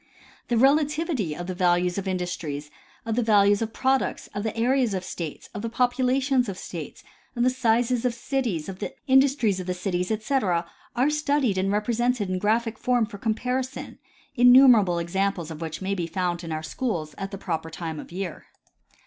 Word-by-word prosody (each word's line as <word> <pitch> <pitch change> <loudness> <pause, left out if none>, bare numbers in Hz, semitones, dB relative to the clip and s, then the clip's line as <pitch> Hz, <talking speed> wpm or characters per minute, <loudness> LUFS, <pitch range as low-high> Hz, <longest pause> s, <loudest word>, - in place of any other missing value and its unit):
The 240 - +1
relativity 285 - +2
of 175 - -6
the 185 - -4
values 180 0 +2
of 195 - -5
industries, 170 -5 -3 0.3
of 225 -1 -1
the 245 - +2
values 205 -2 +4
of 225 0 -2
products, 265 +3 0
of 205 - -3
the 220 +1 -3
areas 245 -2 +2
of 185 - -3
states, 165 -4 -6
of 205 - -5
the 230 - -3
populations 255 +1 +1
of 190 - -5
states, 165 -5 -8 0.3
of 240 - +1
the 255 - +4
sizes 240 -1 +1
of 245 -2 0
cities, 235 - -2
the 190 -1 -6
industries 265 -7 +3
of 185 - -6
the 180 - -1
cities, 180 0 -2
etc, 215 -6 0 0.3
are 260 +5 +2
studied 285 -9 +1
and 195 +1 0
represented 225 0 0
in 185 - -1
graphic 225 +2 0
form 245 -2 +2
for 210 -2 -10
comparison, 250 +4 -3 0.4
innumerable 245 -7 +7
examples 175 0 -1
of 160 - -6
n 165 - -3
which 160 +3 -7
may 195 +1 -1
be 175 -4 -2
found 175 0 -2
in 165 - -6
our 155 0 -3
schools 155 -4 -3
at 195 0 -4
the 195 - -7
proper 165 -4 -3
time 160 -1 -5
of - - -10
year. 180 -2 -6
210 Hz, 185 wpm, -25 LUFS, 180-250 Hz, 0.4 s, innumerable